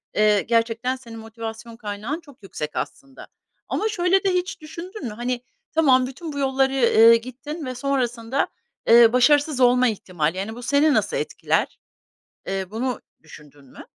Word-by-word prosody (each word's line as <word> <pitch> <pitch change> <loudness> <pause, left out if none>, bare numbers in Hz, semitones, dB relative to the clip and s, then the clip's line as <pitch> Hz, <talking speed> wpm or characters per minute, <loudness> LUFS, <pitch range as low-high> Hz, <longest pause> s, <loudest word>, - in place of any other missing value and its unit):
eee, 210 -1 +4
gerçekten 230 +2 0
senin 230 -3 -11
motivasyon 225 +1 -8
kaynağın 215 +7 -5
çok 285 -9 -19
yüksek 150 -5 -6
aslında. 270 -1 -6 0.4
Ama 435 - 0
şöyle 380 -1 +2
de 390 - +2
hiç 360 -2 -2
düşündün 335 +4 -9
mü? 220 - -4
Hani, 240 +2 -3 0.3
tamam, 260 -5 +4
bütün 300 +4 -8
bu 285 - -4
yolları, 270 0 +1
eee, 230 -3 +6
gittin 280 +6 -8
ve 255 0 -5
sonrasında, 250 -1 -1 0.4
eee, 235 0 +7
başarısız 290 +2 +3
olma 250 0 +5
ihtimali, 180 -6 -2
yani, 215 +4 -4
bu 245 - -9
seni 285 +4 +3
nasıl - - 0
etkiler? - - -1 0.7
Eee, 195 0 -2
bunu 245 +3 -3 0.2
düşündün 145 -2 -16
mü? 130 - -13
250 Hz, 155 wpm, -23 LUFS, 225-280 Hz, 0.7 s, eee